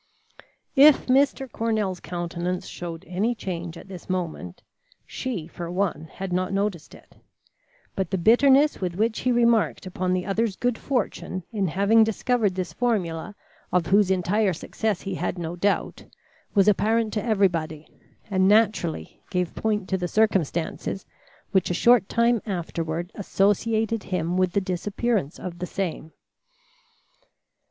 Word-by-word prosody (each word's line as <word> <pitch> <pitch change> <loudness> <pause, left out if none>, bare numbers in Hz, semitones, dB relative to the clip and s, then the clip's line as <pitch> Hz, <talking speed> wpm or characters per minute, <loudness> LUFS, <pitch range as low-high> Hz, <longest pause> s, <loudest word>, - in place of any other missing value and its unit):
If 290 +1 +7
Mr. 270 +1 +2
Cornell's 215 -6 -1
countenance 175 +2 -4
showed 170 0 -7
any 205 +7 0
change 175 -5 -5
at - - -12
this 185 -2 -10
moment, 170 - -4 0.4
she 230 -11 -4
for 170 0 -7
one 180 -3 -1
had 190 -1 -5
not 185 +1 0
noticed 195 -5 -2
it; - - -19 0.8
but 190 -3 -1
the 190 - -1
bitterness 270 - +4
with 180 -2 -2
which 220 +3 0
he 255 - +1
remarked 235 -4 +2
upon 185 0 -2
the 185 -1 0
other's 210 0 0
good 245 +1 -1
fortune 210 -7 -2
in 200 -4 0
having 200 +6 +4
discovered 220 -2 0
this 185 -2 -3
formula 200 -6 -1 0.4
of 180 -2 +2
whose 200 +1 +4
entire 190 +2 +1
success 210 +4 -2
he 195 - -4
had 180 - -2
no 170 0 -4
doubt, 200 +3 -1 0.5
was 200 0 +5
apparent 220 +2 +2
to 210 - -1
everybody, 170 -8 0 0.4
and 190 -1 +3
naturally 205 - +1
gave 180 -2 -1
point 210 -3 -1
to 190 - 0
the 175 - -1
circumstances 190 -2 0 0.5
which 190 -3 +2
a 180 - 0
short 235 0 +4
time 235 -1 +2
afterward 170 -2 -3
associated 215 +3 +1
him 175 -2 -2
with 185 -1 +1
the 200 - +2
disappearance 195 - -1
of 175 -2 -7
the 180 - -3
same. 170 -4 -4
190 Hz, 145 wpm, -25 LUFS, 175-220 Hz, 0.8 s, If